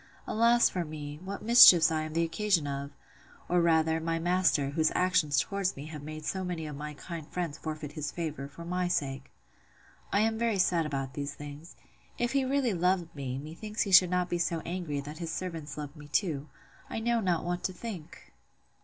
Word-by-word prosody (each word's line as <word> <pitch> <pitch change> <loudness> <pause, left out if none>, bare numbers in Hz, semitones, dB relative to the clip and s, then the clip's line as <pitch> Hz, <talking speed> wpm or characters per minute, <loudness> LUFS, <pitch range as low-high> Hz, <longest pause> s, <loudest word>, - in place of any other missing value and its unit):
Alas 235 +2 +4
for 180 - -2
me! 150 -2 -7
what 200 +1 -6
mischiefs 210 -8 +9
am 160 - +1
I - - -9
the 165 - +3
occasion 175 -1 +1
of!—Or, 140 +5 -4
rather, 160 -1 +3
my 165 0 -1
master, 170 -5 +2
whose 155 +1 +2
actions 175 -6 +3
towards 195 +8 -1
me 140 - -8
have 155 -2 -8
made 155 +1 -7
so 190 +3 -2
many 175 -3 -4
of 150 -2 -6
my 150 +1 -6
kind 165 0 -7
friends 165 -4 -4
forfeit 155 -2 -5
his 150 -1 -4
favour, 155 -5 -4
for 170 +4 -11
my 180 +1 -1
sake! 135 -5 -2 0.8
I 200 - +3
am 220 0 +1
very 230 -3 +1
sad 175 -3 +2
about 135 -3 -3
these 140 0 -4
things: 145 +3 -10 0.4
If 240 0 0
he 275 -1 +2
really 260 -3 +1
loved 180 -1 0
me, 130 -2 -4
methinks 170 +10 -4
he 200 - -4
should 180 -1 +8
not 180 0 +1
be 175 -1 -2
so 165 -1 0
angry, 170 -5 -3
that 150 +3 -9
his 165 -2 -4
servants 160 -6 -5
loved 145 0 -6
me 150 -1 -12
too.—I 150 +3 -4
know 235 +1 +1
not 180 -6 0
what 175 0 -2
to - - 0
think! 185 - -9
165 Hz, 195 wpm, -30 LUFS, 150-185 Hz, 0.8 s, mischiefs